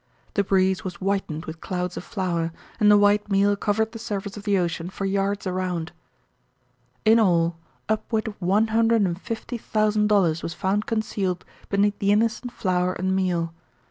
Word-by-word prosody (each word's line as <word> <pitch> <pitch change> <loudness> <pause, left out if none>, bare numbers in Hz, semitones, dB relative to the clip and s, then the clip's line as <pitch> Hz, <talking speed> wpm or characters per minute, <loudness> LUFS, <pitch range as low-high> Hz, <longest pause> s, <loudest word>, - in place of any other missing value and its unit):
The 200 - +2
breeze 190 -1 +2
was 185 -2 -5
whitened 185 -4 -2
with 160 0 -8
clouds 180 -1 -3
of - - -5
flour, 175 -6 -2 0.3
and 210 -2 +5
the 210 - +7
white 205 0 +3
meal 200 +1 +3
covered 220 +2 0
the 225 - -8
surface 200 -2 -4
of 205 -1 -9
the 200 -2 +3
ocean 170 -1 -1
for 195 +1 -4
yards 195 +1 0
around. 180 -3 -2 1.1
In 220 +2 +6
all, 170 -5 +2 0.3
upward 220 +1 -1
of 215 - -5
one 200 +5 +2
hundred 225 0 +3
and 180 -1 -1
fifty 235 +1 -5
thousand 215 -1 +1
dollars 180 -6 +3
was 165 - -5
found 205 +2 0
concealed 200 -5 -1 0.2
beneath 205 +1 +1
the 200 0 +2
innocent 230 +3 +1
flour 185 -5 0
and 190 +1 -1
meal. 175 -3 0
195 Hz, 175 wpm, -24 LUFS, 180-210 Hz, 1.1 s, the